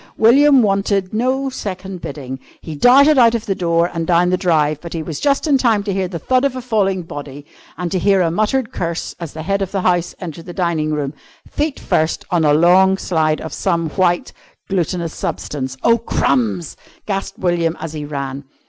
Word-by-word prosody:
William 270 +3 +6
wanted 195 -1 0
no 260 +4 0
second 190 -5 -6
bidding. 135 -2 -6 0.2
He 160 - -8
darted 270 - +5
out 235 -1 +5
of 230 - -3
the 200 - 0
door 170 -1 +1
and 165 -1 -3
down 180 +1 +3
the - - +3
drive, 155 -4 +1
but 170 - -8
he 165 -2 -3
was 155 -2 -5
just 280 +1 +1
in 285 -4 +3
time 225 -5 +2
to 200 -1 -2
hear 190 -1 -1
the 175 -1 -5
thud 255 - +1
of 275 -2 0
a 255 - -4
falling 195 -6 0
body, 145 -2 -8 0.3
and 175 0 -3
to 185 - 0
hear 195 +1 +3
a 165 -2 +1
muttered 215 +6 0
curse 170 -1 -3
as 170 -4 -7
the 155 - -6
Head 195 +3 -1
of 195 - -2
the 195 - -1
House 175 -1 0
entered 165 -1 -8
the 175 - -7
dining 170 -4 -1
room 145 -2 -2 0.3
feet 295 -1 -2
first 160 +1 0
on 175 -2 +2
a 150 - +4
long 180 +5 +5
slide 155 -5 0
of 160 - -7
some 170 -4 -1
white, 175 0 0 0.3
glutinous 175 -3 -2
substance. 130 -2 -4
"Oh, 230 0 +4
crumbs!" 115 - 0 0.3
gasped 195 -1 -3
William 175 -2 0
as 160 -1 -6
he 150 -1 -5
ran. 140 -1 -5
180 Hz, 200 wpm, -18 LUFS, 160-205 Hz, 0.3 s, William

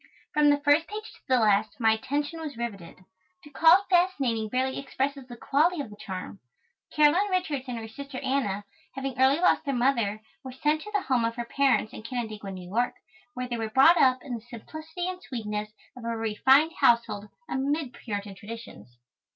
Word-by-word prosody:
From 300 -1 +5
the 290 - +4
first 290 +3 +3
page 430 +1 -7
to - - -20
the 255 -2 +3
last 210 0 +2
my 225 -2 +4
attention 290 +8 -2
was 295 -6 -6
riveted. 195 -6 -7 0.4
To 295 - -14
call 330 +6 +6
it - - -17
fascinating 275 -12 +2
barely 260 +3 -1
expresses 275 -1 -3
the 240 -1 -10
quality 315 +8 +2
of 275 -7 -5
the - - -10
charm. 190 -1 -7 0.5
Caroline 305 +7 +4
Richards 320 -8 -1
and 245 -2 -4
her 225 -1 -6
sister 275 +4 -8
Anna, 205 -7 -1 0.3
having 270 -1 -4
early 270 +4 +5
lost 360 - +3
their 275 -3 -2
mother, 235 -5 +1 0.2
were 260 -1 -8
sent 300 +4 0
to 420 - -9
the 410 -2 0
home 255 -3 +1
of 230 0 -1
her 240 0 -4
parents 265 -3 +1
in - - -8
Canandaigua, 220 -3 -5
New 185 -2 -8
York, 235 +6 0 0.4
where 250 0 -3
they 240 -1 -3
were 225 -1 -3
brought 275 +9 +6
up 255 -1 +3
in 260 - -6
the 230 - -4
simplicity 315 +9 -7
and 370 0 -5
sweetness 215 -7 -4 0.3
of 250 - -11
a - - -5
refined 260 +8 +4
household, 230 -3 +3 0.2
amid 280 -1 -1
Puritan 205 -4 -5
traditions. 200 - -11
255 Hz, 190 wpm, -27 LUFS, 220-295 Hz, 0.5 s, call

